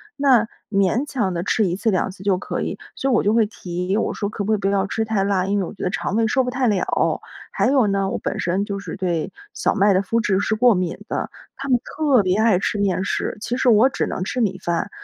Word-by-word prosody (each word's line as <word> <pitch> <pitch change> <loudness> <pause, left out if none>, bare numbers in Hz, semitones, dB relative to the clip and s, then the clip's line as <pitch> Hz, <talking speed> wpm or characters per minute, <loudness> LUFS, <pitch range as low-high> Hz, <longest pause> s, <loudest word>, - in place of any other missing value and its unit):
那 260 -6 +4 0.2
勉 200 +7 +2
强 215 -11 -1
地 170 0 -2
吃 210 +1 +1
1 175 - -1
次 220 +3 0
2 185 -1 0
次 190 0 -11
就 195 -2 +2
可 - - -4
以。 - - -4 0.2
所 270 0 -1
以 - - +3
我 235 - +4
就 205 - +2
会 225 -1 +4
提， 180 -1 -3
我 - - 0
说： 205 - -3
“可 205 - -4
不 220 - +1
可 - - +4
以 - - -8
不 195 - 0
要 195 0 +1
吃 220 - -1
太 210 -3 0
辣， 195 -2 +1
因 200 +1 0
为 190 - -1
我 - - -8
觉 200 - -8
得 - - +1
肠 190 - -2
胃 225 0 +3
受 260 +4 +2
不 250 - -1
太 255 0 0
了。” 200 -4 +1 0.3
还 - - +1
有 260 -3 +4
呢， 195 -1 0
我 - - -2
本 - - -3
身 185 +3 0
就 200 -1 -4
是 180 -5 -7
对 175 -4 -2 0.2
小 - - 0
麦 200 -1 +4
的 185 - +3
麸 225 +4 0
质 195 -4 +1
是 215 +2 0
过 240 +1 +5
敏 180 -3 -2
的， - - -3 0.3
他 275 0 -6
们 250 - +5
特 280 -8 +2
别 185 +1 +1
爱 220 -4 +4
吃 205 +2 -1
面 190 -2 +1
食， - - -2
其 240 +2 -2
实 260 - +3
我 230 +3 +6
只 - - -2
能 - - -3
吃 250 +6 -2
米 195 -4 0
饭， 170 -2 -2
205 Hz, 285 characters per minute, -21 LUFS, 190-230 Hz, 0.3 s, 我